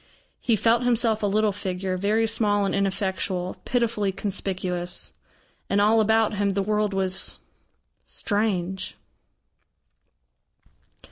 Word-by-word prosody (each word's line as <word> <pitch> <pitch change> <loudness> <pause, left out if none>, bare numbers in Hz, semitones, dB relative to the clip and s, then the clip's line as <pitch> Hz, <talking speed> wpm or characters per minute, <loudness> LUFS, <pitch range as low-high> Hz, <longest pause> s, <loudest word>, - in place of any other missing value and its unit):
He 235 - +2
felt 230 +3 +3
himself 230 -3 +2
a 205 - +1
little 210 +1 +2
figure, 190 -1 -3
very 210 +4 +1
small 210 -2 +1
and 195 - -1
ineffectual, 190 -2 -1
pitifully 230 -5 0
conspicuous. 185 -3 -3 0.6
And 200 - +2
all 215 +2 +4
about 220 0 +2
him, 200 0 +1
the 195 0 0
world 210 0 0
was 190 -1 -1 0.7
strange. 190 -3 -2
205 Hz, 110 wpm, -25 LUFS, 190-220 Hz, 0.7 s, all